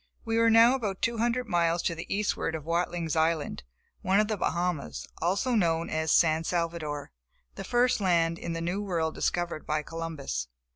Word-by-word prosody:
We 225 0 +1
were 230 0 +5
now 230 +2 +7
about 210 -8 -3
two 230 -1 0
hundred 240 +1 0
miles 170 -2 +1
to - - 0
the 165 0 -8
eastward 200 -5 -1
of 155 -2 -6
Watling's 170 -1 -1
Island, 160 -1 0 0.4
one 190 +2 +3
of 210 0 +2
the 215 - +1
Bahamas, 170 - -2
also 195 +9 +1
known 165 -6 +1
as 160 0 0
San 160 -1 +4
Salvador, 165 -4 -3 0.4
the - - -7
first 245 -2 +2
land 170 -3 +2
in 170 - -4
the 165 - -3
New 175 +4 -2
World 165 -5 -1
discovered 175 -3 -2
by 150 0 0
Columbus. 160 - -4
170 Hz, 180 wpm, -28 LUFS, 160-205 Hz, 0.4 s, now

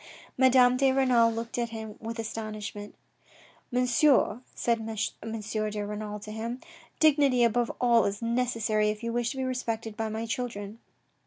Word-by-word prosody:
Madame 255 -1 +5
de 270 0 +4
Renal 250 -4 +4
looked 230 +1 -4
at 235 -1 -1
him 220 -2 -7
with 230 +1 -5
astonishment. 215 -2 -6 0.4
" - - -27
Monsieur," 250 0 +3
said 235 -1 +1
M. 225 0 -4 0.3
de 210 0 -4
Renal 210 0 -5
to 215 0 -8
him, 230 +3 -4 0.2
" - - -26
dignity 285 -5 +4
above 235 +1 +2
all 235 -2 +4
is 200 0 -2
necessary 230 -3 0
if 210 +2 -4
you 230 0 -2
wish 240 0 0
to 270 - -6
be 265 - -1
respected 230 -4 -3
by 220 0 -2
my 220 +1 -3
children." 230 -4 -4
230 Hz, 165 wpm, -28 LUFS, 220-250 Hz, 0.4 s, Madame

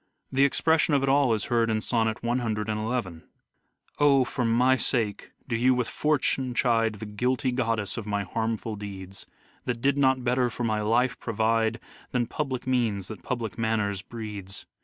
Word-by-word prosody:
The 135 +1 +4
expression 160 +2 +3
of 135 - +2
it 135 - +1
all 140 -2 +4
is 110 -2 0
heard 115 -2 +2
in 110 -1 +1
sonnet 110 0 0
in: 110 -5 -2 0.3
" - - -37
O! 140 -2 +5
for 125 - -2
my 125 +3 +4
sake 115 -4 -1 0.2
do 120 - -1
you 125 +3 +3
with 125 -2 0
Fortune 135 -4 0
chide 115 -3 +2
The 105 - -7
guilty 125 +5 0
goddess 115 -5 -1
of 110 -2 -5
my 100 -1 -1
harmful 110 +2 -2
deeds; 100 -2 -8 0.4
That 120 -2 -2
did 140 +3 +2
not 130 -2 +3
better 125 0 +2
for 120 - -5
my 110 -2 0
life 120 +4 +1
provide 115 0 +1 0.3
Than 125 -1 +2
public 130 -1 -3
means 115 -7 0
that 105 -5 -8
public 115 -1 -4
manners 105 -4 0
breeds. 105 -4 -7
115 Hz, 170 wpm, -27 LUFS, 110-125 Hz, 0.4 s, O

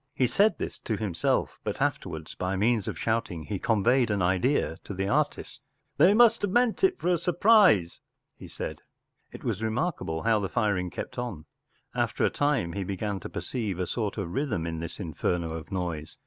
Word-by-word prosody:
He 130 - +3
said 205 - +3
this - - -5
to 110 - -3
himself, 95 -6 -1
but - - -3
afterwards, 80 0 -2
by 90 +1 -2
means 110 +1 +1
of - - -3
shouting, 110 -7 -1
he 100 +3 -4
conveyed 120 +3 +2
an 100 -3 0
idea 95 - +1
to 100 - -7
the 95 +1 -1
artist. 105 - -1 0.4
14 - - +7
They 205 - +4
must 230 0 +6
have 205 - 0
meant 240 - +2
it 380 -1 +4
for - - -1
a 175 -2 +2
sur 180 - -1
prise,” 185 - +5 0.3
he - - -11
said. - - -6 0.5
It - - -10
was - - -2
remark¬ 120 +11 -1
able 80 0 -3
how 110 -1 +3
the 95 -2 -2
firing 100 -6 0
kept 120 - -6
on. 110 -11 -5 0.5
After - - 0
a - - +1
time 145 -13 0
he 100 - -2
began 100 +1 -3
to - - -8
perceive 110 -8 -3
a 90 - -1
sort 105 +1 -3
of 85 - -4
rhythm 115 - -1
in 80 -1 -3
this 85 0 -6
inferno 85 -1 -2
of 80 0 -7
noise. 85 -5 -4
105 Hz, 205 wpm, -27 LUFS, 90-130 Hz, 0.5 s, 14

